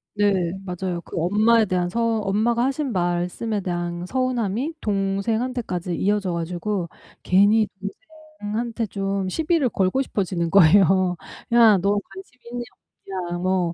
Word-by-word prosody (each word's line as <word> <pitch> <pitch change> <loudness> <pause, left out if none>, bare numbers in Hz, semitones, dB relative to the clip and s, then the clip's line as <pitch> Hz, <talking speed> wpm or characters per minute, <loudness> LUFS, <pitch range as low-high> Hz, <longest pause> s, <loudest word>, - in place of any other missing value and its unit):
네. 195 -4 +2
맞아요. 180 -1 -3
그 - - -9
엄마에 215 +6 +3
대한 180 -2 0
서 230 +2 0
엄마가 220 +4 +1
하신 275 0 -1
말씀에 180 +4 -1
대한 175 -1 -3
서운함이 255 - -1
동생한테까지 200 -1 -1
이어져 200 -1 0
가지고 175 +2 -3 0.3
괜히 205 +3 +4 0.7
동생한테 225 +2 -2
좀 195 -1 -2
시비를 320 - +1
걸고 195 +5 +1
싶어지는 185 -8 -2
거예요. 185 0 +5 0.4
야, 225 -4 +7
너 200 +3 +1
관심 375 -10 -13
있냐, 245 0 -4 0.7
없냐. 175 - -3
뭐 180 -2 0
200 Hz, 285 characters per minute, -23 LUFS, 180-230 Hz, 0.7 s, 야